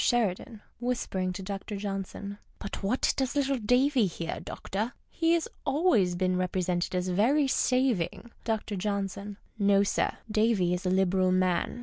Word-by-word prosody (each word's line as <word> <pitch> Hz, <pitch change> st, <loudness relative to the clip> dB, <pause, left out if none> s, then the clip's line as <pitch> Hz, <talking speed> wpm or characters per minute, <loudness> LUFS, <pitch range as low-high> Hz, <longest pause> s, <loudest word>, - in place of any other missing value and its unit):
Sheridan 225 Hz, -1 st, 0 dB, 0.2 s
{whispering 230 Hz, -7 st, -1 dB
tu 185 Hz, +1 st, -6 dB
Dr. 200 Hz, +2 st, -5 dB
J.).— 205 Hz, +1 st, -4 dB
\l\\t 200 Hz, +1 st, -6 dB
what 210 Hz, +6 st, +1 dB
docs 265 Hz, 0 st, -1 dB
little 275 Hz, -2 st, +1 dB
Davy 250 Hz, +1 st, +3 dB
here, 165 Hz, -1 st, -4 dB
doctor? 215 Hz, +5 st, -4 dB, 0.2 s
He 330 Hz, 0 st, +2 dB
has 335 Hz, -1 st, +1 dB, 0.2 s
always 270 Hz, -, +3 dB
been 185 Hz, 0 st, +1 dB
rcj)rcsented 180 Hz, -1 st, -1 dB
as 180 Hz, 0 st, 0 dB
very 255 Hz, +11 st, +3 dB
saving. 240 Hz, -5 st, +1 dB
Dr. 220 Hz, -2 st, -2 dB
J. 200 Hz, +1 st, 0 dB, 0.4 s
— -, -, -33 dB
No, 200 Hz, 0 st, +4 dB
sir. 200 Hz, -, 0 dB
Davy 215 Hz, -5 st, +2 dB
is 180 Hz, +1 st, -2 dB
a -, -, +3 dB
liberal 185 Hz, 0 st, +3 dB
man. 185 Hz, +4 st, +1 dB
200 Hz, 150 wpm, -29 LUFS, 185-245 Hz, 0.4 s, No